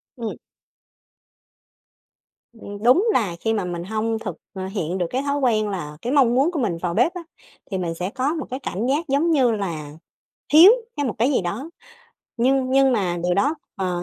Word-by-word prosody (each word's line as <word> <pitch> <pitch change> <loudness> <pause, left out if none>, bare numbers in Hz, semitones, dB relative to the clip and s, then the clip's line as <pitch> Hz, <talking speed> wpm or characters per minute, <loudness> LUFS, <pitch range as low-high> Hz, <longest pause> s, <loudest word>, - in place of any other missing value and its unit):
Ừm. 230 -3 -5 2.2
Ưm, 205 -2 -10
đúng 345 - +5
là 195 - 0
khi 225 +3 0
mà 205 -4 -1
mình 175 -1 -4
hông 220 +3 -2
thực, 190 -7 -5 0.2
à, 190 -1 -5
hiện 180 -2 -2
được 180 - 0
cái 260 +2 -1
thói 285 0 -1
quen 215 -5 +1
là 150 -6 -5
cái 245 +3 -2
mong 250 -4 +4
muốn 280 +6 +3
của 325 - -3
mình 190 -9 -1
vào 175 -2 -2
bếp 340 - +2
á, 355 - -6 0.5
thì 190 - -1
mình 170 -2 -2
sẽ 180 +3 -3
có 270 +6 -1
một 310 -5 -4
cái 260 +2 -4
cảm 235 -2 -3
giác, 295 +5 0
giống 290 +5 +2
như 260 -6 +3
là, 170 -9 -4 0.6
thiếu 340 +7 +10 0.3
hay 290 - 0
một 220 - -3
cái 240 +7 +2
gì 255 - +2
đó. 215 - -4 0.7
Nhưng 260 +2 +2
nhưng 270 0 +4
mà 185 -7 0
điều 180 0 +1
đó, 280 +10 +2 0.2
ờ, 180 -3 -2
225 Hz, 200 wpm, -22 LUFS, 185-270 Hz, 2.2 s, thiếu